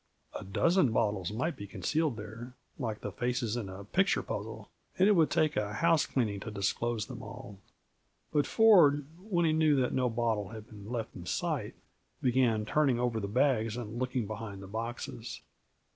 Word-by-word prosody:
A - - -6
dozen 145 - +2
bottles 105 -5 0
might 140 +11 -1
be 100 - -8
concealed 155 +3 -1
there, 115 +4 -8 0.2
like 110 -5 -3
the - - -4
faces 120 -2 -1
in 110 -6 -3
a 95 +1 -8
picture 190 - +1
puzzle, - - -6 0.3
and 190 - +5
it - - +6
would 165 -6 +4
take 155 0 +2
a 105 -1 -1
housecleaning 130 -8 +2
to 110 - -6
disclose 105 +2 -1
them 125 -3 -8
all. 115 -3 -9 0.7
But 145 -1 +2
Ford, 170 -11 +6
when 180 -3 0
he 160 - +3
knew 155 -2 +4
that 130 -2 +1
no 125 -1 +2
bottle 110 -4 -1
had 110 -1 -9
been 105 -1 -11
left 115 -3 -4
in 90 -1 -9
sight, 150 -11 -2 0.4
began 120 -4 +2
turning 135 -1 +2
over 120 -2 0
the 100 - -3
bags 115 -1 +1
and 115 -1 -5
looking 125 -2 -1
behind 105 -2 -6
the - - -9
boxes. 115 - -5
120 Hz, 175 wpm, -31 LUFS, 105-145 Hz, 0.7 s, it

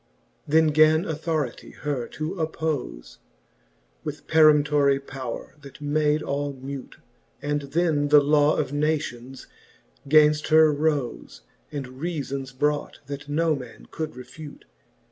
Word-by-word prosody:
XLIV. - - -9
Then 160 +1 +5
gan 155 +2 +4
Authority 155 -4 -3
her 140 -5 -3
to 155 +2 -5
appofe 155 - -4 0.8
With - - -6
peremptorie 150 -3 +4
powre^ 135 +2 -8
that 140 0 -13
made 150 +1 +1
all 140 0 -2
mute; 135 0 -8 0.4
And 145 0 -1
then 145 0 0
the 150 0 +7
Law 145 +1 +3
of - - -2
Nations 145 -4 -2 0.6
gainft 150 0 +5
her 155 -1 +6
rofe, 145 - -2 0.3
And 145 -3 -4
reafons 135 -1 -5
brought, 145 +3 -1
that 145 +1 -7
no 160 +1 +1
man 125 -4 -11
could 155 -1 -5
refute. 145 +4 -11
145 Hz, 125 wpm, -25 LUFS, 140-155 Hz, 0.8 s, the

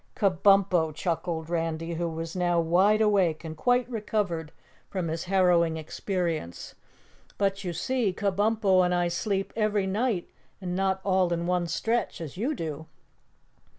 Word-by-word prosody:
"Kabumpo," 195 -4 +3
chuckled 165 -1 -2
Randy, 165 0 -2
who 170 +1 -2
was 165 +1 -5
now 175 -1 +1
wide 185 +6 +3
awake 190 -7 +2
and 160 -1 -6
quite 245 +7 +2
recovered 205 -9 -2 0.4
from 180 -4 -3
his 160 +1 -3
harrowing 175 -3 +3
experience. 160 - -3 0.6
"But 195 0 0
you 180 - -2
see, 245 +3 0
Kabumpo 200 0 +2
and 180 0 +1
I 175 0 +1
sleep 195 +3 -2
every 215 -2 +1
night 205 -1 -1 0.3
and 180 -2 -4
not 190 0 0
all 185 -2 +2
in 170 0 -1
one 180 -1 0
stretch 225 +5 -1
as 160 -5 -7
you 250 +11 -1
do." 160 - -5
180 Hz, 145 wpm, -27 LUFS, 165-200 Hz, 0.6 s, Kabumpo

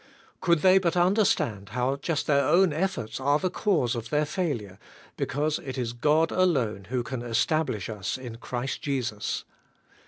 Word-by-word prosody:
Could 170 -4 +2
they 190 0 +6
but 175 -2 0
under 190 +5 +4
stand 105 - 0
how 125 +2 0
just 150 +2 -2
their 140 -1 +3
own 180 -2 +4
efforts 165 - -2
are 145 +2 +3
the 185 +3 -1
cause 160 - +1
of 115 -2 -5
their 150 +3 +1
failure, 140 - -3 0.4
because 150 +4 -1
it 135 -2 -6
is 120 -2 -2
God 150 +6 +2
alone 130 - +1
who 125 +3 -2
can 130 -1 -5
establish 120 - 0
us 105 -1 -3
in 120 -3 -8
Christ 125 +2 -4
Jesus. 120 -7 -2
140 Hz, 165 wpm, -27 LUFS, 120-165 Hz, 0.4 s, they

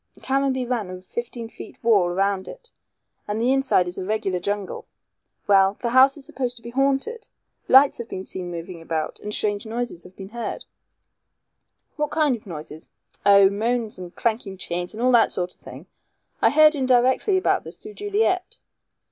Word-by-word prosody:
"Caranby 265 -1 0
ran 235 -6 -2
a 185 0 -7
fifteen 235 +5 -6
feet - - -11
wall 205 -6 +4
round 195 +1 0
it - - -11 0.6
and 210 +1 -2
the 245 +3 +3
inside 270 -9 +2
is 180 +2 -4
a - - -3
regular 195 -2 -1
jungle. 200 +1 -4 0.6
Well, 195 -1 +4
the 235 - -2
house 265 +3 +6
is 280 - -10
supposed 250 -3 -3
to 230 - -12
be 235 - -8
haunted. 275 - 0 0.4
Lights 270 0 +6
have 235 - -6
been 190 - -6
seen 180 -2 -6
moving 170 0 -7
about 160 -1 -3
and 210 - -6
strange 205 -1 -1
noises 230 -5 -4
have 180 +1 -14
been 195 0 -9
heard." 235 +1 -5 1.3
"What 300 -1 0
kind 305 -4 +2
of 215 - -13
noises?" 155 -2 -8 0.4
"Oh, 200 -1 +7
moans 225 0 -1
and 180 -1 -9
clanking 220 -4 -2
chains 175 +1 -4
and 230 - -4
all 255 - +4
that 235 -2 +5
sort 180 0 -3
of - - -26
thing. - - -11 0.6
I - - +6
heard 310 +1 +6
indirectly 260 - +2
about 375 - +1
this, - - -8
through 425 - -11
Juliet." 405 -3 -1
225 Hz, 180 wpm, -23 LUFS, 190-265 Hz, 1.3 s, Oh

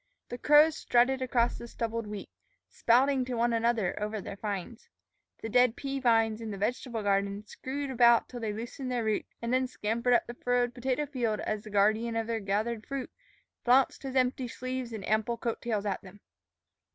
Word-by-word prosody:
The 245 - -6
crows 300 +3 +6
strutted 250 +2 +2
across 245 -2 +1
the 235 - -8
stubbled 230 -1 -3
wheat, 210 -1 -7 0.4
spouting 260 +3 +3
to 250 -1 -3
one 235 0 +1
another 230 -5 +1
over 210 +1 -2
their 195 - -7
finds. 205 +3 -5 0.5
The - - -2
dead 245 +1 +4
pea 275 -1 -4
vines 225 -3 +2
in 225 - -5
the 200 - -5
vegetable 230 +2 -2
garden 200 +1 0
screwed 270 +5 -5
about 235 -2 +5
till 245 - -8
they 220 -2 -2
loosened 240 +4 -5
their 245 -2 0
roots, 215 -1 -2
and 235 +1 -1
then 260 0 +2
scampered 235 +1 0
up - - +2
the 240 - -7
furrowed 245 0 0
potato 260 +4 -1
field 245 -6 -1
as 215 -1 -3
the - - -8
guardian 215 +3 +2
of 225 0 0
their 230 0 -2
gathered 215 +3 -1
fruit 275 -2 -4 0.5
flounced 255 +2 +3
his 270 -1 -6
empty 255 0 +1
sleeves 255 0 -5
and 215 -3 -6
ample 220 +2 +1
coat 230 0 -3
tails 215 -3 -2
at 195 -2 -2
them. 200 0 -14
235 Hz, 190 wpm, -29 LUFS, 215-250 Hz, 0.5 s, crows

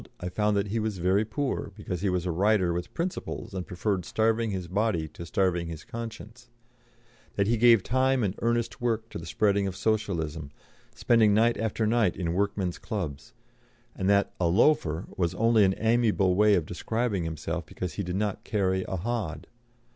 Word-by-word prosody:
I 90 - -4
found 105 +2 +1
that 100 0 -1
he 115 +3 -1
was 110 -2 -2
very 95 +4 +2
poor, 110 0 -3
because 95 -4 -5
he 100 - +1
was 90 -1 -1
a 90 - 0
writer 95 0 +2
with 85 +1 -4
principles 175 - -4
and 95 -2 -4
preferred 95 +1 -1
starving 115 +3 +1
his 95 -3 -4
body 95 -3 0
to 85 +3 -9
starving 85 -2 0
his 80 -2 -7
conscience; 115 +1 -8 0.9
that 100 - +2
he 115 +3 +2
gave 115 -3 +5
time 130 0 +2
and 95 -3 0
earnest 120 0 -1
work 115 -2 -1
to - - -6
the 80 - -9
spreading 100 +2 +1
of 95 - -4
Socialism, 85 -9 -1 0.5
spending 110 -4 +4
night 115 +2 +4
after 110 0 -1
night 110 -4 +2
in 85 -3 -1
workmen's 100 -2 -1
clubs; 85 - -5 0.6
and 95 - -1
that 100 0 +3
"a 85 - +2
loafer" 85 - +2
was 85 -1 0
only 115 +1 +4
an 95 -1 +3
amiable 110 -5 +2
way 105 +2 +5
of 85 -4 0
describing 105 +3 -2
himself 80 -2 -4
because 90 -2 -5
he 100 - -3
did 90 0 -3
not 105 0 -2
carry 95 -3 0
a - - -3
hod. 100 -4 -3
100 Hz, 185 wpm, -27 LUFS, 90-110 Hz, 0.9 s, gave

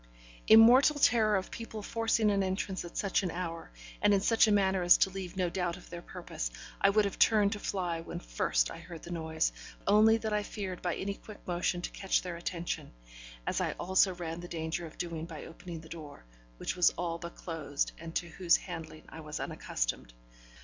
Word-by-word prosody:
In 220 - +10
mortal 255 +6 +7
terror 220 -6 +4
of 190 -1 -2
people 220 -2 -7
forcing 225 -1 +1
an 200 -1 +2
entrance 190 0 -2
at 175 - -9
such 200 0 +1
an 185 - -2
hour, 165 -1 -5 0.3
and 205 - +5
in - - +3
such 225 +3 +4
a - - +3
manner 190 -2 +3
as 175 0 +7
to 190 - +2
leave 190 -1 -6
no 185 -1 +2
doubt 175 0 -2
of - - -15
their 175 -1 -6
purpose, - - -5 0.3
I 195 - +6
would 210 +1 +3
have 200 - -4
turned 210 -3 +5
to 205 - -3
fly 175 -5 -2
when - - -6
first - - 0
I - - -8
heard 165 -1 -10
the 175 - -8
noise, 160 -1 0 0.3
only 215 +2 +6
that 220 -1 -3
I 210 - +2
feared 195 -3 -5
by 175 -2 -1
any 200 +1 -3
quick 210 +1 -12
motion 175 0 -1
to - - -3
catch 195 - 0
their 180 -2 -4
attention, 170 - -4 0.5
as - - 0
I - - 0
also 190 +1 +2
ran 170 -1 -5
the 175 - -7
danger 165 0 -3
of 155 - -15
doing 165 -2 -4
by 160 -3 -8
opening 165 0 -8
the 160 - -13
door, 150 - -9 0.3
which - - -3
was 180 -1 +5
all 170 -1 -2
but 170 0 -8
closed 155 -4 -3
and 165 0 -8
to 175 - -1
whose 170 0 +3
handlings 160 -3 -8
I 160 - -10
was 155 -1 -6
unaccustomed. - - -3
180 Hz, 210 wpm, -31 LUFS, 165-200 Hz, 0.5 s, In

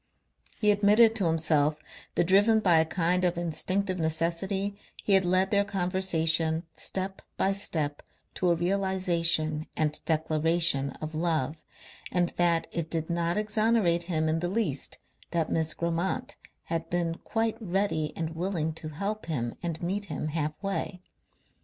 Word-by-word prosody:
He 210 -1 +4
admitted 210 +2 +5
to 195 - 0
himself 155 -2 +2 0.4
that - - +3
driven 205 +5 +4
by 175 -6 +4
a 160 - +3
kind 180 +2 +1
of 175 -1 +2
instinctive 185 +3 -1
necessity 170 +5 0 0.3
he 200 - +3
had 190 -1 +5
led 185 +2 +3
their 200 0 +4
conversation 175 -4 0
step 190 +4 -4 0.2
by 195 - +2
step 155 -7 -1 0.3
to 180 - 0
a 170 - +4
realization 175 -4 0
and 155 -1 0
declaration 160 -2 +1
of 155 0 -5
love, 155 -2 -1 0.5
and 175 -1 +2
that 170 -1 +3
it 165 -1 -3
did 160 0 -2
not 170 +1 0
exonerate 210 -5 +2
him 160 -2 +1
in 160 +1 +1
the 175 +1 -2
least 185 -9 -1 0.3
that 165 -2 -1
Miss 160 -1 +1
Grammont 170 +2 -2 0.3
had 165 0 -3
been 170 -1 -1
quite 225 -1 -1
ready 190 -5 0
and 160 -1 -2
willing 165 -2 -1
to 155 0 -6
help 200 +6 -4
him 120 -7 -2
and 170 -1 -4
meet 200 +4 -1
him 155 - -4
half 150 -1 -2
way. 195 -1 -3
170 Hz, 150 wpm, -28 LUFS, 160-190 Hz, 0.5 s, admitted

